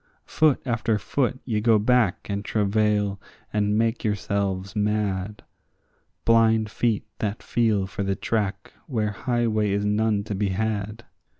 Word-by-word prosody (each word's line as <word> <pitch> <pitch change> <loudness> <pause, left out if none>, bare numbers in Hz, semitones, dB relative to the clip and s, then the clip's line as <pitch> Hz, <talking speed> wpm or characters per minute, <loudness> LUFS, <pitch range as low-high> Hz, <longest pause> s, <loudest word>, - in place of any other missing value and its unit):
Foot 155 -3 +2
after 115 -3 0
foot 130 +5 -1
ye 110 -4 -1
go 115 0 +5
back 110 -2 +2
and 100 0 -3
travail 105 -1 +1 0.3
and 105 0 +1
make 115 0 0
yourselves 100 -1 -1
mad; 105 -1 -1 0.8
Blind 110 -2 +4
feet 115 -1 0
that 105 0 -3
feel 110 -4 +1
for 100 +1 -6
the 100 -1 0
track 100 -2 -2
where 110 -6 -1
highway 110 -1 0
is 100 +1 0
none 105 0 +1
to 105 - -5
be 100 0 0
had. 105 +2 -2
105 Hz, 135 wpm, -24 LUFS, 100-115 Hz, 0.8 s, go